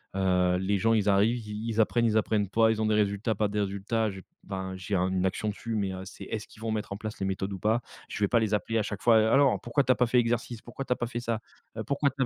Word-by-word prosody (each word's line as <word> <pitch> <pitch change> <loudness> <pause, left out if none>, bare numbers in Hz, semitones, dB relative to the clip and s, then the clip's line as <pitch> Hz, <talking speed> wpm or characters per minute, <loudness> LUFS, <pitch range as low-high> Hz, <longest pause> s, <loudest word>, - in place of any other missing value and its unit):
Heu, 90 -1 +2
les 100 +2 +1
gens, 115 +3 +2
ils 105 -2 +2
arrivent, 105 +5 +3
ils 105 +2 -4
ils 110 0 +2
apprennent, 115 +2 +2
ils 110 -1 +2
apprennent 105 -2 +1
pas, 110 +1 +4
ils 110 -1 0
ont - - +1
des 110 - +2
résultats, 105 +2 +1
pas 105 +1 +1
des 105 +1 -1
résultats, 100 +3 -1
j'ai 95 -1 -10 0.2
enfin, 95 -1 -4
j'ai 95 +2 -3
un 90 +1 +1
une 95 0 0
action 100 +3 -1
dessus, 115 +2 -4
mais, 100 -3 -1
heu, 95 0 -6
c'est, 95 - -10
est-ce 105 -1 -5
qu'ils 110 - -17
vont 115 -1 -2
mettre 105 -2 -3
en - - -6
place 110 +1 -6
les 95 - -1
méthodes 95 +1 -2
ou 95 - -6
pas? 110 +4 +1 0.3
Je - - -5
vais - - +4
pas 115 - +3
les 110 -2 0
appeler 115 +2 0
à 110 - +2
chaque 105 -1 -5
fois: 115 -2 +5 0.2
«Alors, 135 -2 +4
pourquoi 120 +4 +1
tu 130 - +2
as 130 - +4
pas 125 - +3
fait 125 +1 +4
exercice? 120 -1 -1
Pourquoi 135 +3 -7
tu 125 - +1
as - - -7
pas 120 - -3
fait 120 - -4
ça? 115 -2 -2 0.4
Heu, - - -2
pourquoi 140 0 +1
tu 135 +1 -5
as? - - +4
110 Hz, 310 wpm, -28 LUFS, 100-115 Hz, 0.4 s, fois